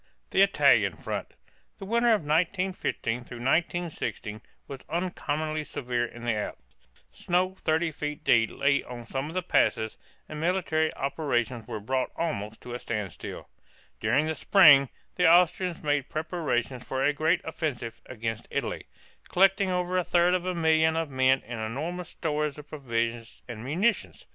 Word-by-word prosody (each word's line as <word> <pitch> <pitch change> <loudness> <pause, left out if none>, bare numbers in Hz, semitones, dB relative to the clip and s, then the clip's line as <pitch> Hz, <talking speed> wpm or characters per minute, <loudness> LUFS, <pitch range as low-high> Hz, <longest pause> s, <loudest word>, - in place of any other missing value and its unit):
THE - - +4
ITALIAN - - +4
FRONT. - - -5 0.4
The 195 - -8
winter 235 +4 +2
of 220 -6 +4
1915 175 -5 0
1916 125 - -2 0.3
was 135 -1 -7
uncommonly 155 -3 -2
severe 120 -4 -2
in 120 0 -9
the 120 - +2
Alps; 105 -1 -6 0.4
snow 185 +1 0
thirty 160 +1 +1
feet 150 0 -5
deep 115 -2 +4
lay 140 0 +2
on 120 -1 -9
some 135 +4 -3
of 165 - -9
the 185 - 0
passes, 110 -9 +1 0.3
and 155 - -7
military 165 -3 +1
operations 125 -5 -1
were 110 - -4
brought 130 +5 -1
almost 110 -10 -3
to 120 - -8
a 120 - -4
standstill. 105 -8 -5 0.5
During 120 +8 +2
the 160 - -1
spring 145 -7 +6 0.3
the 180 -2 +5
Austrians 175 +1 +3
made 145 -2 0
preparations 150 -6 -2
for 130 +1 -2
a 150 - +3
great 160 +4 +2
offensive 145 -8 -4
against 115 -2 -4
Italy, - - -3 0.4
collecting 195 +1 +4
over 180 0 0
a - - 0
third 175 +1 +3
of 185 0 0
a 185 - -1
million 160 -1 +3
of 165 -3 -2
men 130 0 +3
and 115 -1 -6
enormous 155 +11 -4
stores 150 -2 -2
of 150 0 -11
provisions 115 -5 -3
and 115 -3 -7
munitions. 185 - 0
150 Hz, 155 wpm, -27 LUFS, 120-175 Hz, 0.5 s, spring